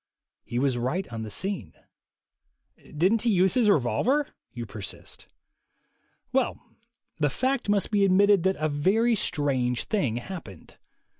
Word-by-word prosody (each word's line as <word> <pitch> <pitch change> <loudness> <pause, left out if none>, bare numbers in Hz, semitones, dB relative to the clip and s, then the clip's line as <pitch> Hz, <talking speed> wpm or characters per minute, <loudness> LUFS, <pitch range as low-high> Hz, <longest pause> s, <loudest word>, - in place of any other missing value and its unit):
He 120 - -5
was 130 -1 +1
right 155 +11 -2
on 115 - -4
the 110 - -5
scene. 190 - -4 1.2
"Didn't 195 +8 +3
he 240 - +1
use 190 -2 +3
his 235 -4 +3
revolver?" 205 - +2 0.2
you 120 -1 -6
persist. 105 -3 -9 1.1
Well, - - +1 0.6
the 145 -1 +2
fact 255 - -1
must 205 0 +1
be 205 -2 +3
admitted 200 0 +5
that 190 +2 +1
a 155 - -1
very 195 +11 +2
strange 130 - 0
thing 185 - -1
happened. 120 - -8
180 Hz, 135 wpm, -26 LUFS, 125-205 Hz, 1.2 s, admitted